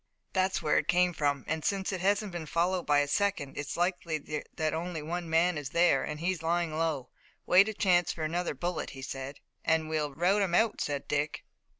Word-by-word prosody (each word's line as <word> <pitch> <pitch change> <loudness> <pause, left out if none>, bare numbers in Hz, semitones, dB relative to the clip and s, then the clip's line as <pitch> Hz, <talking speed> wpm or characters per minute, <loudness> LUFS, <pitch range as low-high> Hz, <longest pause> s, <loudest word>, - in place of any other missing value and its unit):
"That's 190 0 +1
where 150 - +3
it - - -4
came 180 0 +3
from, 145 -4 0
and, 160 0 -2
since 195 -1 0
it 185 -2 -3
hasn't 200 +1 +1
been 170 -3 -5
followed 175 +2 0
by 145 -1 +5
a 145 - -1
second, 165 -4 0
it's 145 - -4
likely 165 -4 -2
that 155 -1 0
only 165 -1 -3
one 170 +2 -4
man 165 0 +3
is 140 -2 -6
there, 170 -4 +3
and 150 0 -5
he 175 +3 +1
is 175 -4 -5
lying 165 -1 0
low, 155 -5 -1 0.4
waiting 195 +4 +6
a 215 - -5
chance 180 -3 +3
for 160 - -5
another 170 0 -1
bullet," 175 +4 -3
he 135 - -8
said. 135 +1 -6 0.2
"Then 160 -1 +2
we'll 150 -3 -2
rout 190 +5 +2
him 180 -3 +1
out," 220 +2 +2
said 145 -1 -2
Dick. 150 +1 -1
165 Hz, 215 wpm, -30 LUFS, 150-180 Hz, 0.4 s, waiting